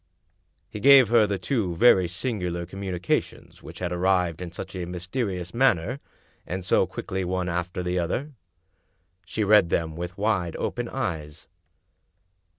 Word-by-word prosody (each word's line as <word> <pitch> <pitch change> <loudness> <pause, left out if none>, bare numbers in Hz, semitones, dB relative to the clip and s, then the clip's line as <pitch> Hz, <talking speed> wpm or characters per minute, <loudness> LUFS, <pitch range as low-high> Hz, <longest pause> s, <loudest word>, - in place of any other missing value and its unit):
He 105 - -8
gave 135 -1 +7
her 115 -2 +5
the 100 -1 -1
two 95 -2 -1
very 95 -3 +5
singular 90 -3 -3
communications 90 -1 -3
which - - -11
had 90 -1 -3
arrived 90 -2 +1
in 90 -2 -6
such 90 - -8
a 90 -1 -3
mysterious 90 0 -4
manner, 120 -1 +2 0.5
and 95 0 -4
so - - +3
quickly 95 0 -4
one 90 0 -2
after 90 +1 -3
the 90 0 -1
other. 130 - -2 1.0
She 105 +7 -1
read 105 -3 +5
them 80 -2 -1
with 90 +2 -6
wide 100 -5 0
open - - -3
eyes. 75 -2 -4
90 Hz, 145 wpm, -25 LUFS, 85-105 Hz, 1.0 s, gave